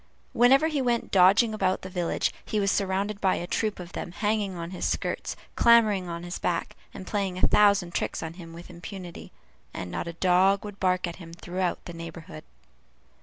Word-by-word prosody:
Whenever 265 +6 +5
he 300 -4 -1
went 240 -2 0
dodging 200 +5 +5
about 190 -3 0
the - - -5
village, 180 -2 -1
he 215 - -2
was 200 -1 +2
surrounded 200 +1 -1
by 190 -1 +3
a 175 - -4
troop 215 +3 -2
of 175 -1 -8
them 175 - -6
hanging 205 0 -1
on 170 0 -6
his 185 - -6
skirts, - - -2 0.2
clambering 215 -6 +4
on 170 0 -5
his 175 +1 -5
back, 170 -1 -2 0.2
and 185 - -9
playing 195 -2 -2
a - - -5
thousand 200 -4 +4
tricks - - -2
on 160 0 -5
him 170 -2 -11
with 170 +2 -11
impunity; 180 0 -9 0.4
and 90 -1 -5
not - - -4
a 170 - -5
dog 190 +3 +3
would 205 -1 -9
bark 185 -1 +1
at 170 -1 -6
him 165 -2 -11
throughout 180 +1 -3
the 175 - -7
neighborhood. 165 -1 -9
185 Hz, 195 wpm, -27 LUFS, 175-205 Hz, 0.4 s, Whenever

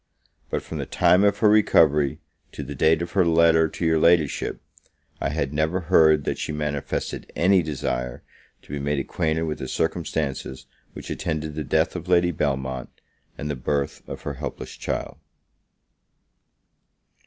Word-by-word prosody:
But, - - -2
from - - -6
the - - -4
time 90 +2 +4
of 100 0 +3
her 110 - +3
recovery 75 -9 +4 0.4
to 75 - -6
the 70 +2 -6
date 80 +4 +3
of 85 - -6
her 95 - +3
letter 80 -1 +4
to 85 - -4
your 80 -1 +3
Ladyship, 85 -3 +2 0.6
I - - 0
had 70 -1 -2
never 80 +4 0
heard 80 -4 +4
that - - -2
she - - -3
manifested 75 -2 -3
any 95 +1 +4
desire 65 -5 -3 0.4
to - - -14
be 70 - -2
made 70 +1 -1
acquainted 80 +3 -1
with 80 -2 -3
the 65 - -5
circumstances 75 -5 -2 0.3
which - - -8
attended 75 0 -3
the 75 +1 -4
death 65 - +1
of 90 0 -6
Lady 90 -1 +4
Belmont, 65 -4 -2 0.5
and 75 - -5
the 75 - -2
birth 70 +2 -2
of - - -7
her 70 - -3
helpless 70 -1 -6
child. - - -4
75 Hz, 160 wpm, -24 LUFS, 70-85 Hz, 0.6 s, time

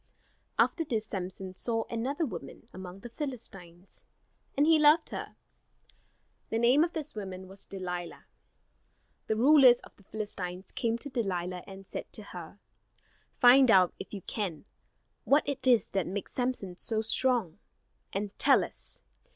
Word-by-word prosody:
After 330 - +3
this 225 -8 -2
Samson 190 -2 -5
saw 225 +4 -1
another 265 +8 -1
woman 170 - -8
among 185 +1 -9
the 240 - -8
Philistines, 195 - -8 0.5
and 290 - +5
he 320 0 +5
loved 305 +2 +5
her. - - -6 1.1
The 225 - 0
name 245 +6 +5
of 340 - -2
this 305 -2 -5
woman 190 -3 -6
was 195 +1 -11
Delilah. 180 -3 -6 1.0
The 220 - +1
rulers 255 0 +7
of - - -16
the - - -20
Philistines 190 -3 -4
came 230 -3 -1
to 285 +4 -7
Delilah 180 -6 -2
and 195 0 -10
said - - -7
to 215 - -1
her: 175 -1 -9 0.8
"Find 255 +1 +7
out, 185 -4 +6
if - - -8
you 195 -4 -7
can, 190 -8 -4 0.6
what 285 +2 +3
it 275 -2 -3
is 245 -3 +4
that 195 -3 -1
makes 195 +2 -5
Samson 245 -8 -2
so 220 +1 -2
strong, 230 -6 +1 0.5
and 200 +1 -3
tell - - +5
us. - - -8
215 Hz, 150 wpm, -30 LUFS, 185-255 Hz, 1.1 s, rulers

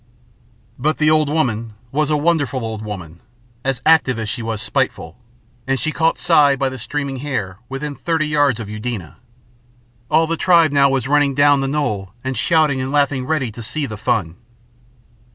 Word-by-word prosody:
But 155 +4 0
the 155 0 +3
old 155 -2 +3
woman 115 -8 -1 0.2
was 150 +2 0
a 150 - +2
wonderful 145 -6 0
old 110 -1 -5
woman, 90 -6 -8 0.4
as 135 -2 -2
active 155 -6 +4
as 110 -1 -3
she 120 - -3
was 115 -1 -3
spiteful, 85 -4 -2 0.5
and 135 0 0
she 155 - -1
caught 160 +1 +1
Si 150 -5 +4
by 135 0 0
the 130 -1 -7
streaming 140 +3 -3
hair 110 -9 -4
within 140 +2 -4
thirty 160 +1 -1
yards 145 -5 +2
of 110 - -6
Eudena. 105 -5 -6 0.9
All 165 - +4
the 165 +1 -2
tribe 170 -4 +4
now 140 -1 +4
was 135 -2 -1
running 145 -1 +2
down 145 0 +4
the 135 - -1
knoll 110 -10 -2
and 130 0 -3
shouting 155 -5 +2
and 130 +1 -3
laughing 140 -3 +1
ready 140 -7 -1
to 115 - -9
see 145 +6 -2
the 110 -5 -6
fun. 95 -5 -1
135 Hz, 180 wpm, -19 LUFS, 115-150 Hz, 0.9 s, active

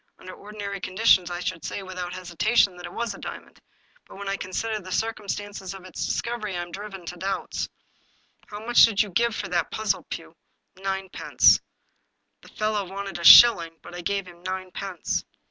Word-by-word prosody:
Under 185 0 -10
ordinary 205 -1 -7
conditions 185 -1 +3
I 175 0 -4
should 165 -2 -4
say, 200 - -4
without 180 -1 -6
hesitation, 185 +3 +2
that 175 0 -8
it - - -11
was 230 0 -3
a - - -11
diamond. - - -9 0.5
But - - -13
when 200 0 -7
I 195 - 0
consider 215 +4 -3
the 185 -2 -10
circumstances 205 -3 -3
of 190 -1 -11
its 185 - -5
discovery, 215 -6 -3
I - - -2
am 175 - -11
driven 195 -2 -8
to 175 +1 -7
doubts. 195 +2 -3 0.8
How 210 +1 -8
much 240 +1 +6
did 215 -3 +5
you 205 - -9
give 235 +4 +1
for - - -4
that 175 -1 0
puzzle, 220 -1 -1
Pugh?" - - -7 0.3
" - - -51
Ninepence; 190 -1 +3 0.8
the - - -16
fellow 215 -1 -1
wanted 195 -2 -5
a - - -6
shilling, 170 -5 +9
but - - -11
I 175 - -6
gave 200 +2 -1
him 175 -1 -14
ninepence. 185 0 -4
195 Hz, 185 wpm, -25 LUFS, 180-210 Hz, 0.8 s, shilling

